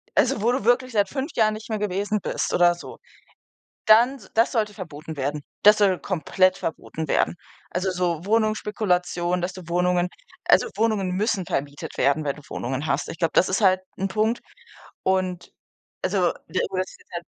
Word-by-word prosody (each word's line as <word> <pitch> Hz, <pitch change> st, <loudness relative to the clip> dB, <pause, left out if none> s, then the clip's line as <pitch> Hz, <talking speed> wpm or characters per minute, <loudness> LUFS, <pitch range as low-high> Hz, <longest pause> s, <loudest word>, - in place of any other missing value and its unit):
also, 215 Hz, -, +2 dB
wo 235 Hz, +3 st, +3 dB
du 250 Hz, -4 st, -1 dB
wirklich 250 Hz, +1 st, +2 dB
seit 205 Hz, -3 st, +2 dB
5 275 Hz, +3 st, -3 dB
Jahren 215 Hz, -2 st, +3 dB
nicht 215 Hz, +2 st, -10 dB
mehr 220 Hz, -, -1 dB
gewesen 205 Hz, +1 st, -1 dB
bist -, -, -2 dB
oder 175 Hz, 0 st, +5 dB
so, 175 Hz, -, -10 dB, 0.9 s
dann 235 Hz, +5 st, +6 dB
s 215 Hz, -, -17 dB
das 230 Hz, +2 st, +4 dB
sollte 215 Hz, -3 st, 0 dB
verboten 160 Hz, -5 st, -8 dB
werden. 145 Hz, +2 st, -2 dB, 0.2 s
Das 210 Hz, +1 st, +8 dB
soll 195 Hz, -3 st, +3 dB
komplett 185 Hz, +1 st, +1 dB
verboten 160 Hz, -1 st, -5 dB
werden. -, -, +1 dB, 0.4 s
Also, 185 Hz, +2 st, -1 dB
so 175 Hz, -2 st, -1 dB
Wohnungsspekulation, 195 Hz, -5 st, 0 dB
dass 180 Hz, +1 st, -2 dB
du 185 Hz, -, -9 dB
Wohnungen 180 Hz, +1 st, +1 dB, 0.4 s
also, -, -, +5 dB
Wohnungen 215 Hz, -5 st, +1 dB
müssen 195 Hz, 0 st, 0 dB
vermietet 145 Hz, -2 st, -4 dB
werden, 140 Hz, +3 st, +2 dB
wenn 140 Hz, -, -1 dB
du -, -, -11 dB
Wohnungen 130 Hz, +4 st, -3 dB
hast. 140 Hz, +1 st, -1 dB
Ich -, -, -8 dB
glaube, 165 Hz, -3 st, +1 dB
das 185 Hz, -, +5 dB
ist 190 Hz, +4 st, 0 dB
halt 185 Hz, -2 st, +5 dB, 0.2 s
'n 195 Hz, -, -1 dB
Punkt. 220 Hz, +4 st, 0 dB, 0.6 s
Und, 185 Hz, -1 st, -1 dB, 0.5 s
also, -, -, +2 dB
der -, -, -1 dB
oberste -, -, -4 dB
Teil. -, -, -5 dB
185 Hz, 175 wpm, -24 LUFS, 175-215 Hz, 0.9 s, Das